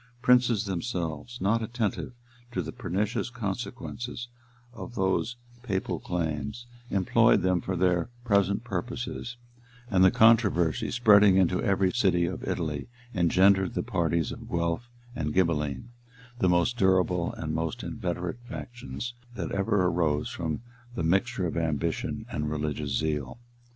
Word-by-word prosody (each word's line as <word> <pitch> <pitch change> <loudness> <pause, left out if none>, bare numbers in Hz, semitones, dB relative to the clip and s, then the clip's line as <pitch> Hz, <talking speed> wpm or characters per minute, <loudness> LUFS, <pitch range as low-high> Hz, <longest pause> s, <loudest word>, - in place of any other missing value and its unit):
Princes 125 -4 +4
themselves, 90 +1 -3
not 110 +4 +2
attentive 115 +1 -2 0.4
to 95 -6 -2
the - - -5
pernicious 105 +5 -2
consequences 120 +2 -5 0.4
of 110 +1 -8
those 95 +4 0 0.3
papal 100 -6 -2
claims, 90 +7 -3 0.2
employed 95 -2 +3
them 90 -2 +2
for 95 - -3
their 90 +1 +2 0.2
present 100 -1 +2
purposes; 120 0 -4 0.5
and 95 -2 +5
the 95 - +8
controversy, 100 -8 +4
spreading 105 -4 +6
into 90 -1 +3
every 95 -1 +2
city 95 -7 +2
of - - -4
Italy, 75 -3 -2 0.3
engendered 95 +1 +4
the - - 0
parties 85 -7 0
of - - -9
Guelf 85 +7 -1 0.3
and 75 -5 -2
Ghibbelin; 75 - 0 0.5
the 95 - +3
most 90 +8 +2
durable 90 -3 +2
and 80 -1 -3
most 80 +9 -2
inveterate 90 -2 -3
factions 120 0 -6 0.2
that 100 - -4
ever 100 -1 +1
arose 80 -4 +1
from 80 +4 -3 0.3
the 85 - -2
mixture 95 +5 +1
of 85 - -2
ambition 80 -4 -1
and 75 0 -2
religious 75 -2 -2
zeal. 75 - -2
95 Hz, 130 wpm, -28 LUFS, 85-115 Hz, 0.5 s, the